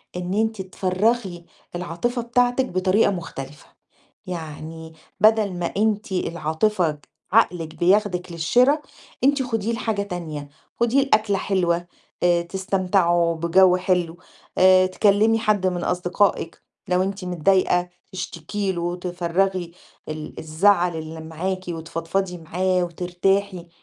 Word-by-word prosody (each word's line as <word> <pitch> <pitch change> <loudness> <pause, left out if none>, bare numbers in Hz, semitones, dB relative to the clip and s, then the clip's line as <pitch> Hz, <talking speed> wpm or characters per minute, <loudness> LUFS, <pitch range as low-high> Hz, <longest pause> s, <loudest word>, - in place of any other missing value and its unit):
إن 180 +1 -3
أنتِ 220 0 0
تفرَّغي 190 0 -1 0.3
العاطفة 180 +8 -2
بتاعتِك 245 +2 +2
بطريقة 185 0 +2
مختلفة. 150 -6 -7 0.6
يعني 160 -1 -7 0.3
بَدَل 215 -2 +4
ما 175 -1 -3
أنتِ 215 -1 0
العاطفة 170 0 0 0.3
عقلِك 175 -7 +2
بياخدِك 180 -1 +1
للشِرا، 245 - +3 0.5
أنتِ 280 0 +3
خُديه 225 -3 -2
لحاجة 220 -3 -1
تانية، 165 -7 -6 0.3
خُديه 240 +4 +3
لأكلة 215 -6 +2
حلوة 175 -3 0 0.4
آآ 175 -1 +3
تستمتعوا 180 -2 +1
بجَو 180 +3 +4
حلو 180 -2 0 0.4
آآ 185 0 +6
تكلِّمي 210 +4 +3
حد 215 -4 +1
من 180 -1 -1
أصدقائِك 180 0 0 0.3
لو 180 0 +2
أنتِ 195 0 -4
متضايقة 180 0 +2 0.2
تشتكي 190 +2 -3
له 175 - -4
وتفرَّغي 175 +1 -1 0.4
ال 155 0 -7
الزعل 175 +2 +2
اللي 160 0 -7
معاكِ 180 +4 -4
وتفضفضي 170 +3 -3
معاه 180 +3 0
وترتاحي. 180 +1 -1
185 Hz, 110 wpm, -23 LUFS, 170-200 Hz, 0.6 s, آآ